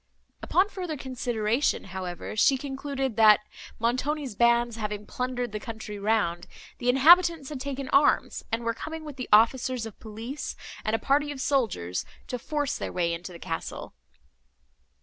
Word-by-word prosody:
Upon 370 +3 +3
further 360 -6 -5
consideration, 245 -1 0
however, 185 +1 -5
she 265 +5 +4
concluded, 270 -2 -3
that, 215 -2 +7 0.4
Montoni's 255 +3 -1
bands 235 +1 +3
having 210 -1 -4
plundered 245 0 -3
the 215 - -4
country 220 -2 -7
round, 200 -5 0 0.3
the 245 - 0
inhabitants 325 +2 +6
had 295 -3 -5
taken 275 -1 -4
arms, 285 +1 +3
and 230 +1 -1
were 230 0 0
coming 315 +6 -7
with 295 -3 -8
the 255 - -5
officers 235 +2 +4
of 225 - -10
police 225 +6 -6 0.3
and 215 - +1
a - - +2
party 290 +5 +1
of 285 - -7
soldiers, 220 - 0 0.3
to 250 - -3
force 290 +2 -2
their - - -4
way 170 -2 0
into 175 +2 -6
the 170 - -9
castle. 165 -1 -5
245 Hz, 155 wpm, -27 LUFS, 215-275 Hz, 0.4 s, that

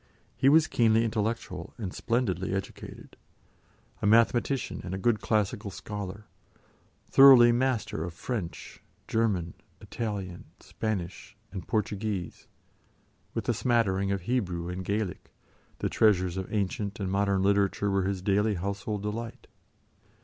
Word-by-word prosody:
He 135 - +4
was 155 +2 +6
keenly 115 -3 +3
intellectual 110 -5 -3
and 100 -6 -5
splendidly 95 -6 -1
educated; 95 - -7 0.8
a 105 - +1
mathematician 115 +4 +2
and 95 0 -4
a - - -3
good 110 +3 +1
classical 105 0 0
scholar, 105 +1 -7 0.9
thoroughly 130 -3 +9
master 120 -9 0
of 85 -1 -6
French, 100 -4 -5 0.3
German, 100 -7 0 0.3
Italian, 100 -6 -5
Spanish, 100 -3 -5
and 95 -4 -7
Portuguese, 105 -3 -3 0.9
with - - -3
a - - +3
smattering 100 -5 +1
of 100 -1 -1
Hebrew 90 -6 -2
and 90 +1 -4
Gaelic, 100 0 -3 0.5
the - - -1
treasures 95 -5 +2
of 95 -1 -5
ancient 100 0 -2
and 100 - -2
of 95 - -2
modern 100 -1 +1
literature 100 0 +2
were 95 -1 +1
his 95 -1 -2
daily 105 +2 +2
household 100 +3 -3
delight. 110 +2 -5
100 Hz, 125 wpm, -28 LUFS, 95-115 Hz, 0.9 s, thoroughly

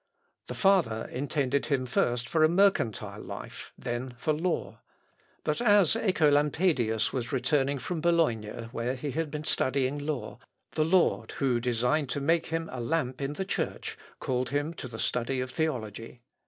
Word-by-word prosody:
The - - -5
father 180 - +3
intended 140 +1 0
him 135 -4 +1
first 120 -1 0
for 160 +3 +2
a 155 - +6
mercantile 185 - +2
life, - - -8
then 120 +1 -4
for 155 +4 0
law. 165 +3 -2 0.6
But 150 - -1
as 205 -7 +5
Œcolampadius 150 - +2
was 125 -3 -2
returning 140 +1 +1
from 165 +4 -4
Bologna, 120 -10 +1
where 120 +1 -2
he 140 +2 -4
had 160 +3 -2
been 150 +1 -5
studying 135 -1 0
law, 145 -2 -4 0.3
the 155 - +1
Lord, 180 +2 +2
who 130 -4 +1
designed 125 +4 +1
to 145 - -1
make 165 +4 +2
him 165 0 -2
a 125 - -4
lamp 130 -1 -1
in 140 +1 -2
the 190 +5 -3
Church, - - -3 0.2
called 125 0 -1
him 145 +4 -1
to 135 - -7
the 115 -2 -8
study 125 +3 -1
of 130 0 -3
theology. 120 -5 -3
140 Hz, 160 wpm, -29 LUFS, 125-160 Hz, 0.6 s, a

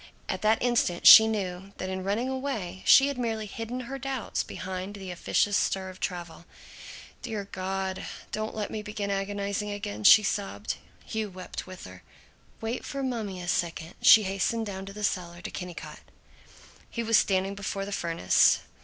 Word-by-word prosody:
At - - -3
that 215 +2 +2
instant 235 -8 +1
she 220 - +11
knew 195 -2 -3
that 185 - -4
in 190 0 -4
running 210 +6 -1
away 260 -9 -4
she 275 - +8
had 280 -3 -3
merely 225 -3 -2
hidden 225 +4 -5
her 270 +2 -6
doubts 265 -3 -2
behind 185 +2 -6
the 190 -2 -7
officious 200 +3 +1
stir 190 -1 0
of 185 - -15
travel. 175 -2 -5 0.8
"Dear 220 -5 -4
God, 190 0 -3 0.3
don't 215 +1 -3
let 210 -1 -3
me 215 - -4
begin 210 -1 -4
agonizing 200 +1 -2
again!" 105 - -5
she 210 - +9
sobbed. 195 - -3 0.3
Hugh 220 -1 -3
wept 185 0 -8
with 185 -1 -10
her. - - -11 0.6
"Wait 225 +2 -3
for 275 -1 -4
mummy 220 -7 -3
a - - -7
second!" 170 -1 -2
She 215 - +8
hastened 195 +4 -1
down 195 -1 -6
to 195 - -8
the 210 +1 -7
cellar, 175 -3 -2
to 180 - -7
Kennicott. 165 -4 -7 0.9
He 235 - -3
was 225 -1 +5
standing 195 0 +1
before 200 0 -4
the 200 - -7
furnace. 165 - +3
200 Hz, 170 wpm, -28 LUFS, 185-220 Hz, 0.9 s, she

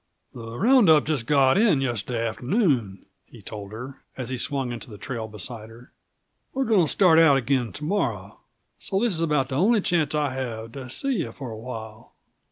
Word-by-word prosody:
"The 115 -1 -8
round 240 - +5
up 155 -2 +6
just 145 -7 -2
got 140 +3 +4
in 205 -10 +4
yesterday 120 -2 -2
afternoon," 125 - 0 0.2
he - - -15
told 105 -2 -8
her, 125 +5 -9 0.2
as 130 -2 -4
he 130 - -2
swung 135 0 -2
into 120 0 -7
the 105 - -10
trail 115 -1 -5
beside 110 +2 -7
her. 120 +3 -15 0.6
"We're 270 0 0
going 220 -4 +4
to - - 0
start 175 -5 +5
out 155 -4 +6
again 130 -2 0
to 150 - -8
morrow, 200 +7 -2 0.4
so 195 - -1
this 235 -1 +1
is 165 - -2
about 150 -5 +1
the 130 - -2
only 215 +7 +4
chance 160 -6 +1
I'll 150 -2 0
have 115 -4 -5
to 130 0 -8
see 270 - -1
you 170 - -3
for 130 -4 -8
a - - -6
while." 110 -2 -9
130 Hz, 200 wpm, -24 LUFS, 115-160 Hz, 0.6 s, up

